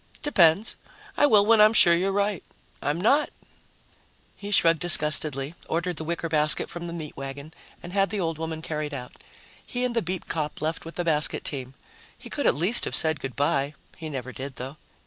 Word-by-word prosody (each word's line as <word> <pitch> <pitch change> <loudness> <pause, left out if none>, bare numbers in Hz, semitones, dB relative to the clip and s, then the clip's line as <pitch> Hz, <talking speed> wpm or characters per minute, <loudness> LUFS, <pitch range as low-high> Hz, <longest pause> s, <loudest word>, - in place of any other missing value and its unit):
"Depends. 190 - +3 0.4
I 290 - +4
will 210 -5 +5
when 225 0 +5
I'm 215 +1 +6
sure 175 -6 +6
you're 185 +3 +1
right. 200 -1 -1 0.4
I'm 150 +3 -1
not." 275 +10 +3 1.1
He 205 - -8
shrugged 165 -5 +4
disgustedly, 150 -4 +3 0.2
ordered 170 +1 -2
the - - -3
wicker 170 +1 -3
basket 150 -1 +3
from 175 0 -7
the - - -6
meat 160 -3 -7
wagon 140 +3 -8 0.3
and 175 - -9
had 195 -1 +2
the 210 +1 -3
old 165 -3 -2
woman 160 0 -5
carried 150 -2 -4
out. 125 -2 -8 0.5
He 250 0 -3
and 245 -1 -3
the 230 - +2
beat 180 0 -5
cop 150 -2 -4
left 160 +2 -3
with 165 - -9
the 175 - -2
basket 150 -2 +3
team. 135 -2 -4 0.4
He - - -13
could - - -1
at - - +3
least 185 +10 +1
have - - -1
said 160 -2 +2
good 135 -4 -6
by. 140 0 0 0.2
He 160 -2 -7
never 130 -3 -6
did, 135 +1 -8
though. 135 +4 -8
165 Hz, 200 wpm, -25 LUFS, 150-190 Hz, 1.1 s, I'm